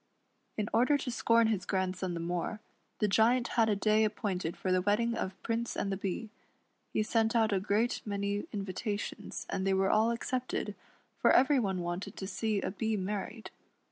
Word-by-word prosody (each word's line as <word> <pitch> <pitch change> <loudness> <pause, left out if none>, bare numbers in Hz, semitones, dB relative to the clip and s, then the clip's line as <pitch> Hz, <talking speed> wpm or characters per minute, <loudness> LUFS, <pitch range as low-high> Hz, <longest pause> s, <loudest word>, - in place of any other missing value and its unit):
In 210 -1 -1
order 250 +6 +4
to 260 -2 -4
scorn 230 -1 +3
his 215 -4 +1
grandson 185 -1 -1
the - - -3
more, 175 +5 -2 0.4
the 210 - +2
Giant 235 +4 +3
had 225 -2 +3
a 210 - +3
day 215 +2 +3
appointed 195 -5 -2
for 185 - -1
the 185 0 +3
wedding 210 +5 +2
of 190 -2 -4
Prince 230 0 -2
and 195 - -1
the - - 0
Bee. 200 +3 -4 0.6
He 215 - +1
sent 225 +1 +1
out 220 -2 +3
a 195 - +2
great 210 +5 +1
many 200 0 -2
invitations, 205 +1 -4
and - - -2
they 190 - +3
were 190 0 +2
all 220 +2 +4
accepted, 250 +2 -2 0.5
for - - +4
every 270 +1 +5
one 190 -5 -1
wanted 175 +2 -4
to 190 - -4
see 205 +2 -1
a - - -2
Bee 220 +1 -1
married. 205 +3 -4
210 Hz, 185 wpm, -31 LUFS, 190-225 Hz, 0.6 s, every